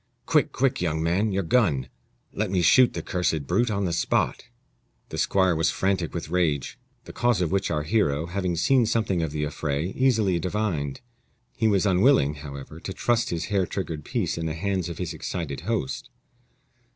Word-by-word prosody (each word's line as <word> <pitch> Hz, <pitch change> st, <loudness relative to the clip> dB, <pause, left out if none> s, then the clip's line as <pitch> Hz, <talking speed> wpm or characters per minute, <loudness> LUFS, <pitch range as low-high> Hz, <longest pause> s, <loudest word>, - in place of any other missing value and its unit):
"Quick, -, -, +2 dB
quick! 135 Hz, 0 st, 0 dB
young 80 Hz, -2 st, 0 dB
man 95 Hz, +6 st, +1 dB
your 95 Hz, 0 st, 0 dB
gun; 80 Hz, -, +2 dB, 0.5 s
let 105 Hz, -1 st, -1 dB
me 90 Hz, -2 st, +1 dB
shoot 120 Hz, +9 st, +6 dB
the -, -, -4 dB
cursed 80 Hz, -5 st, -1 dB
brute 120 Hz, -, +1 dB
on 100 Hz, -2 st, -1 dB
the 85 Hz, -, -1 dB
spot." 85 Hz, -, 0 dB, 0.6 s
The -, -, -5 dB
squire 95 Hz, -3 st, +2 dB
was 80 Hz, 0 st, +2 dB
frantic 95 Hz, -2 st, 0 dB
with 85 Hz, -3 st, -5 dB
rage, 80 Hz, -7 st, 0 dB, 0.2 s
the -, -, -11 dB
cause 120 Hz, -3 st, +2 dB
of 90 Hz, -3 st, 0 dB
which 100 Hz, +1 st, 0 dB
our 75 Hz, 0 st, -1 dB
hero, 75 Hz, -4 st, +1 dB
having 90 Hz, 0 st, -2 dB
seen 120 Hz, +8 st, +3 dB
something 105 Hz, -6 st, 0 dB
of 80 Hz, -, -1 dB
the 75 Hz, 0 st, -3 dB
affray, 75 Hz, +3 st, -2 dB
easily 110 Hz, -9 st, +2 dB
divined. 85 Hz, -6 st, -2 dB, 0.5 s
He 110 Hz, -, +1 dB
was 100 Hz, -2 st, +2 dB
unwilling, 95 Hz, -, +4 dB
however, 70 Hz, +1 st, -8 dB
to 95 Hz, -, -6 dB
trust 120 Hz, +2 st, +1 dB
his 85 Hz, -1 st, -2 dB
hair 95 Hz, -3 st, +2 dB
triggered 80 Hz, -6 st, -4 dB
piece 85 Hz, -, -2 dB
in 80 Hz, -, -2 dB
the 80 Hz, -, -3 dB
hands 95 Hz, 0 st, -1 dB
of 85 Hz, -, -6 dB
his 90 Hz, -3 st, -4 dB
excited 80 Hz, -6 st, -4 dB
host. 105 Hz, -, -2 dB
90 Hz, 185 wpm, -25 LUFS, 80-100 Hz, 0.6 s, shoot